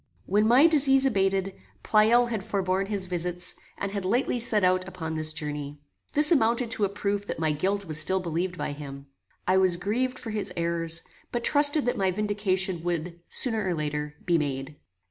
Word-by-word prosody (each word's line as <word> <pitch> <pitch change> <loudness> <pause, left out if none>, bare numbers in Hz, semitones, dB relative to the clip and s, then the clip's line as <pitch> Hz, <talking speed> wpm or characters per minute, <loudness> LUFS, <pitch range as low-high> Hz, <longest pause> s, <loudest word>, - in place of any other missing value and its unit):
When 210 +3 +2
my 250 +6 +6
disease 275 -4 +4
abated, 195 -4 0 0.3
Pleyel 230 +3 +4
had 215 -4 -3
forborne 195 -2 -1
his 200 -2 -2
visits, 180 0 -3 0.2
and 200 - -4
had 200 -1 -4
lately 240 +5 0
set 220 -3 +5
out 185 0 +2
upon 165 -4 -6
this 155 0 -1
journey. 150 -2 -5 0.4
This 300 +2 +4
amounted 235 -4 +2
to 215 -2 +1
a - - -2
proof 205 0 -3
that - - -4
my 160 -1 0
guilt 195 +6 -1
was 155 -3 +1
still 190 +4 +3
believed 175 +1 -3
by - - -3
him. 140 -1 -9 0.4
I 185 +1 +3
was 185 -2 +3
grieved 245 +8 -2
for 225 - -7
his 205 -3 -3
errors, 170 -1 -1 0.3
but 240 -1 -3
trusted 290 +1 +5
that 245 - -1
my 190 -1 +2
vindication 190 -3 -1
would, 170 0 -4
sooner 225 -4 +1
or 185 -3 -1
later, 150 -1 -4
be 170 -2 +2
made. 140 0 -4
190 Hz, 185 wpm, -26 LUFS, 170-220 Hz, 0.4 s, my